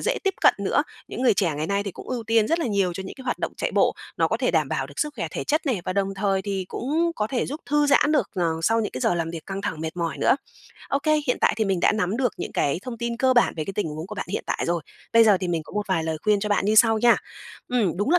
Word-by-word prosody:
dễ - - 0
tiếp 390 - +1
cận - - +6
nữa. - - +1 0.3
Những - - -5
người 235 -5 +5
trẻ 175 -6 +1
ngày 155 +1 -2
nay 200 0 0
thì 200 - -4
cũng - - -11
ưu 250 -2 -2
tiên 225 -1 +2
rất 330 - +2
là 325 - -1
nhiều 200 -4 +1
cho 190 - -5
những - - -8
cái 265 - -11
hoạt 245 - -1
động - - -3
chạy - - -1
bộ, - - +3 0.2
nó - - +2
có - - 0
thể - - +1
đảm - - +1
bảo - - -2
được - - -14
sức 300 -1 0
khỏe - - -3
thể - - -4
chất 310 0 0
này, 230 -9 0
và 185 - -2
đồng 195 0 -1
thời 195 -1 0
thì 195 -2 -3
cũng 325 +6 0
có 210 - 0
thể 245 +2 -1
giúp 295 +4 -5
thư 295 0 +2
giãn 290 +1 +4
được, 300 - +1
ờ, 180 - 0 0.2
sau 225 +5 +3
những 210 - -2
cái 130 - -5
giờ - - +2
làm 165 -1 -2
việc 165 -2 -8
căng 195 0 -4
thẳng 160 -7 -3
mệt 160 +2 -4
mỏi 170 -2 -2
nữa. - - +4 0.5
OK, 280 +1 0 0.2
hiện 250 - +1
tại - - +4
thì 220 - +1
mình 190 -3 0
đã - - +4
nắm 210 0 0
được 250 -4 +1
những - - -5
cái 145 +4 +1
thông 240 -3 -6
tin 235 0 -2
cơ 260 +1 +3
bản 240 - +4
về 155 - -2
cái 195 - -5
tình 205 -3 -1
huống 155 +3 -6
của 210 - -7
bạn 205 - -4
hiện 200 - -3
tại - - -1
rồi, 170 -1 0 0.3
bây 230 0 +7
giờ 205 -3 +6
thì 180 - -2
mình 165 -2 -1
có - - -14
một 210 0 -2
vài 165 -4 +1
lời 160 -1 -2
khuyên 210 -1 +3
cho 210 - -2
bạn 205 - +1
như 215 +2 +2
sau 225 0 +6
nha. 240 +1 +5 0.5
Ừm, 225 -9 +1
đúng 205 - 0
là 355 - +5
210 Hz, 320 wpm, -24 LUFS, 185-245 Hz, 0.5 s, bây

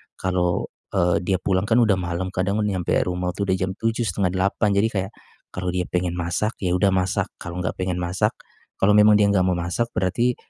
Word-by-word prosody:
kalau, 90 -1 -1 0.3
eee, 85 0 +3
dia 95 0 +1
pulang 95 0 +1
kan 115 - +3
udah 105 -4 +3
malem, 90 +1 -3
kadang 100 +4 0
nyampe 95 -4 -1
rumah 90 0 -2
itu 100 - -2
udah 95 - +2
jam 95 0 -1
7:00, 115 +2 -1
7:30. 95 +3 0
Jadi 105 +3 +4
kayak, 95 +1 -2 0.4
kalau 90 0 -5
dia 90 - 0
pengen 90 -1 -1
masak, 85 +6 -1
ya 90 -1 +1
udah 100 +2 +3
masak. 95 0 0
Kalau 85 0 -6
enggak - - -2
pengen 90 -1 -1
masak, 90 +1 0 0.5
kalau 105 +2 +4
memang 105 0 +7
dia 105 - +5
enggak 95 -2 +3
mau 90 -1 +1
masak, 85 +7 -1
berarti, 115 +6 +1
95 Hz, 200 wpm, -23 LUFS, 90-100 Hz, 0.5 s, memang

